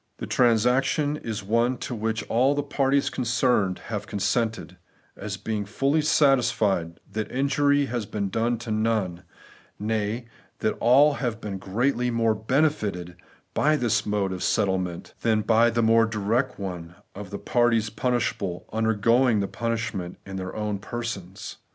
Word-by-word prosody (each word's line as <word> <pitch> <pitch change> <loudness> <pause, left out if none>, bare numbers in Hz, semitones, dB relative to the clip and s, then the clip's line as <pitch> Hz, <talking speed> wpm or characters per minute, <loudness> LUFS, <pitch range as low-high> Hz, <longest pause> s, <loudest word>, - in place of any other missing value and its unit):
The - - -5
transaction 125 +5 +2
is 110 -6 -5
one 115 +5 +1
to 130 +1 -5
which 110 -1 -2
all 130 +5 +2
the 145 - -1
parties 140 -1 +1
concerned 120 -6 +1
have 105 -2 -4
consented, 105 -3 -1 0.4
as 100 -1 -5
being 105 0 -3
fully 135 +9 +1
satisfied 115 - +2
that 110 0 -4
injury 140 +2 +2
has 120 -5 -3
been 100 -2 -2
done 115 +4 0
to 115 - -4
none; 110 -5 0 0.6
nay, 110 +2 -2 0.3
that - - 0
all 140 +5 +5
have 120 -6 -3
been 100 -3 -5
greatly 125 +6 0
more 115 -1 +2
benefited 110 - 0 0.4
by 155 +1 +3
this 120 -7 +1
mode 105 -2 -1
of 90 - -6
settlement 95 -3 -1
than 110 -2 +2
by 115 +2 +4
the 115 0 0
more 115 0 +4
direct 115 +5 -1
one, 90 -3 -6 0.2
of 100 -1 -8
the 100 - -5
parties 115 -2 +1
punishable 115 -7 -1
undergoing 110 +2 +3
the 100 - -1
punishment 115 -6 -3
in 95 - -7
their 95 0 -5
own 105 -2 -2
persons. 100 -4 -6
115 Hz, 145 wpm, -25 LUFS, 100-125 Hz, 0.6 s, all